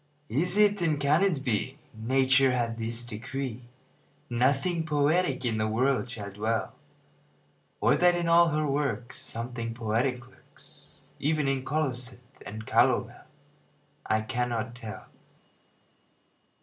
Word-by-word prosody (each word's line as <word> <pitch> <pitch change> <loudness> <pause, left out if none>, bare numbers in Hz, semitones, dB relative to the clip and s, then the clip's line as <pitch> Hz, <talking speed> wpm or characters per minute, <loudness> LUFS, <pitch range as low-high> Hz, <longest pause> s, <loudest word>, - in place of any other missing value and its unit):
Is 175 - +1
it, 205 -2 +4
and 155 -4 +1
can 145 +4 +3
it 175 -9 +1
be, 125 +3 -1 0.2
Nature 130 +3 +3
hath 115 -2 -1
this 115 +1 -2
decree, 120 +1 -5 0.6
Nothing 140 +8 +1
poetic 150 -1 +1
in 110 -2 0
the 110 - +1
world 125 +3 +1
shall 105 -4 -6
dwell? 110 +2 -2 1.1
Or - - +4
that 180 0 +4
in 175 -1 -1
all 170 +1 +6
her 155 -1 0
works 135 -4 -2
Something 115 0 -5
poetic 120 +2 -1
lurks, - - -16
Even 150 -1 +1
in 135 -1 0
colocynth 130 -4 -1 0.3
and 110 +2 -7
calomel? 120 0 +2 0.8
I 110 0 +1
cannot 120 -1 -2
tell. 110 -3 -8
130 Hz, 125 wpm, -28 LUFS, 115-145 Hz, 1.1 s, all